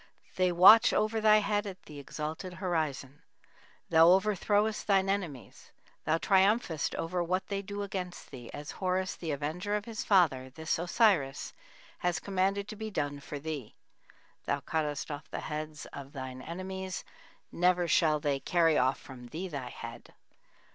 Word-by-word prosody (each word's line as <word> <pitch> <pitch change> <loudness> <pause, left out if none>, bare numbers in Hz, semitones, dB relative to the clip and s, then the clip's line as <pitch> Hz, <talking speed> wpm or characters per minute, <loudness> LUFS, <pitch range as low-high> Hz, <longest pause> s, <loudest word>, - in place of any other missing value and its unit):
They 185 -1 +2
watch 195 +6 +8
over 215 +1 +1
thy 215 0 +6
head 205 0 0
at 190 -2 -8
the 150 -2 -10
exalted 155 +5 -5
horizon. 155 -6 -3 0.7
Thou 165 0 +7
overthrowest 205 +2 +2
thine 195 -2 +3
enemies; 180 - -4 0.4
thou 160 +1 +2
triumphest 190 - +2
over 175 +1 -1
what 185 +2 -1
they 200 -1 -2
do 205 +1 -5
against 185 -3 -6
thee, 120 -3 -9
as 145 +1 -7
Horus, 185 0 -1
the 165 - -6
avenger 155 +8 -2
of 210 0 -3
his 225 -2 -5
father, 150 -10 +3
this 160 +4 -2
Osiris 175 - +1 0.5
has 175 -1 0
commanded 195 +1 0
to - - -6
be 220 +1 -5
done 145 -7 -2
for 145 +1 -7
thee. 145 -6 -6 0.7
Thou - - 0
cuttest 150 -1 -2
off 145 0 -7
the - - -5
heads 155 0 -5
of 140 0 -9
thine 130 -2 -6
enemies; 185 +1 -5 0.5
never 180 0 +2
shall 155 -1 +3
they 145 -2 0
carry 165 0 +3
off 130 +1 +2
from 125 -2 -11
thee 170 +8 -5
thy 140 -6 -5
head - - -10
175 Hz, 155 wpm, -30 LUFS, 150-195 Hz, 0.7 s, watch